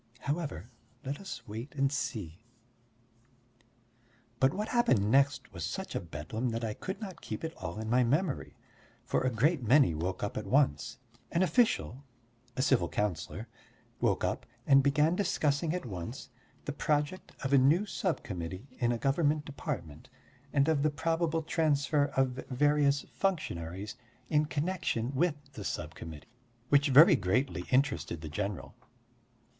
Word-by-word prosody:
However, 140 - -3 0.3
let 140 +2 -3
us 190 -12 -8
wait 115 +7 -7
and 135 -1 +2
see. 95 - -3 2.0
But 130 0 +4
what 210 +6 -3
happened 125 - +3
next 135 -3 +2
was 85 -3 -5
such - - -4
a - - -1
Bedlam 85 +9 -4
that 115 0 -3
I 110 -2 -1
could 190 - -5
not 190 -6 -7
keep - - -6
it 160 0 -3
all 85 +3 -6
in 110 0 -4
my 125 +3 +4
memory. 145 +5 0 0.5
For - - +1
a 130 - +2
great 140 +7 +2
many 125 - +5
woke 90 +5 -3
up 105 - -3
at 110 - -4
once; 140 +1 +2 0.3
an 175 +2 +2
official 145 - +1 0.5
a 130 - +1
civil 135 -3 +3
councillor 105 +2 -2 0.5
woke - - +1
up, - - -2 0.2
and 135 0 +6
began 150 +4 +3
discussing 155 -5 +1
at 180 -4 -3
once 100 +5 -6 0.4
the 145 - -3
project 150 +4 -1
of 135 +1 0
a 140 - +7
new 155 +10 +4
sub 185 -4 -2
committee 90 +3 -5
in 120 -1 +2
a 120 - 0
government 150 +3 +1
department 100 - -6 0.4
and 140 0 +3
of 155 -3 +2
the 155 - +3
probable 165 +1 0
transfer 150 -2 +2
of 130 -1 +1
various 145 +1 +3
functionaries 105 - -2 0.3
in 150 0 +4
connection 145 -6 -1
with 155 +3 +2 0.2
the 105 - -7
sub - - -4
committee 80 -3 -9 0.4
which 145 0 +4
very 155 +6 +9
greatly 95 - 0
interested 130 - +1
the 80 - -6
general. 100 +4 -4
135 Hz, 150 wpm, -31 LUFS, 110-150 Hz, 2.0 s, very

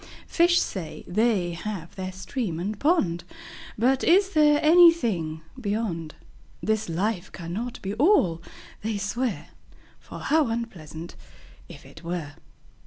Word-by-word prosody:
Fish 345 +1 +4
say, 165 -6 -4
they 200 -3 +1
have 175 -1 -6
their 190 -1 -4
Stream 190 - -4
and 200 +4 -3
Pond; 205 - +2 0.5
But 255 +4 +2
is 385 +3 +4
there 300 -4 +5
anything 245 - +5 0.2
Beyond? 200 -8 -3 0.4
This 220 -3 -1
life 190 +3 -2
cannot 210 +9 -5
be 195 +1 -3
All, 210 - +3 0.4
they 220 0 -2
swear, 200 - -2 0.5
For - - -10
how 310 -3 +2
unpleasant, 175 -9 -6 0.5
if - - -12
it - - -14
were! 165 -4 -4
210 Hz, 120 wpm, -25 LUFS, 170-255 Hz, 0.5 s, there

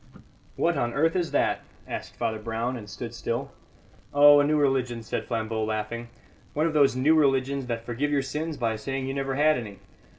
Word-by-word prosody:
"What 170 0 +1
on 120 -1 -1
earth 165 +4 +2
is 175 -3 0
that?" - - +1 0.3
asked - - -6
Father 110 -1 -2
Brown, 115 +3 -2
and 105 -4 -8
stood - - -7
still. - - -3 0.6
"Oh, 145 0 +8
a - - +5
new 150 +1 +2
religion," 130 -5 +1
said - - -3
Flambeau, 110 -1 -2
laughing; 110 +2 -3 0.5
"one 155 +2 +2
of 165 - 0
those 140 -4 +4
new 135 +5 +4
religions 135 -3 +2
that 115 -1 -3
forgive 125 +5 -1
your 145 -2 +1
sins 155 +3 -4
by 115 -2 -1
saying 135 +4 -3
you 135 - -2
never 135 -1 -2
had 150 -1 +3
any. 105 -4 -8
135 Hz, 195 wpm, -26 LUFS, 115-145 Hz, 0.6 s, Oh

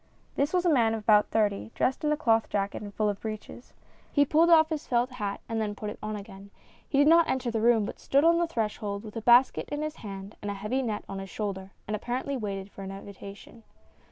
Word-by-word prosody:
This 285 +2 +1
was 360 -1 +1
a 340 - +4
man 225 -4 +3
of 220 - -5
about 210 -1 +4
thirty, 210 -1 0
dressed 265 - 0
in 300 - +2
a 300 - +1
cloth 225 -3 +2
jacket 200 -1 -2
and 205 -1 -7
full 210 0 0
breeches. 215 +3 -8 0.4
He 285 -1 +4
pulled 320 +4 +4
off 320 -2 +6
his 310 -3 -4
felt 245 +1 +1
hat 205 -5 -4
and 225 -1 -2
then 205 -1 -2
put 210 0 -5
it - - -10
on 215 0 -4
again; 200 -1 -10 0.4
he 280 - 0
did 285 - +6
not 335 +1 +6
enter 255 -2 -1
the 225 -1 -1
room, 230 -2 +4
but - - -7
stood 280 +2 +2
on 335 +1 +5
the 345 - +1
threshhold 210 -6 -3
with 215 0 -10
a 225 - -3
basket 245 +3 +4
in 295 +1 -3
his 310 +1 -4
hand 195 -1 -8
and 205 - -4
a 200 - -3
heavy 210 +7 -2
net 220 -5 -3
on 195 - -5
his 195 0 -7
shoulder, 195 -2 -4 0.2
and 210 - -1
apparently 250 +6 -3
waited 200 -4 -4
for - - -11
an 190 - -6
invitation. 200 +2 -10
220 Hz, 240 wpm, -28 LUFS, 205-270 Hz, 0.4 s, off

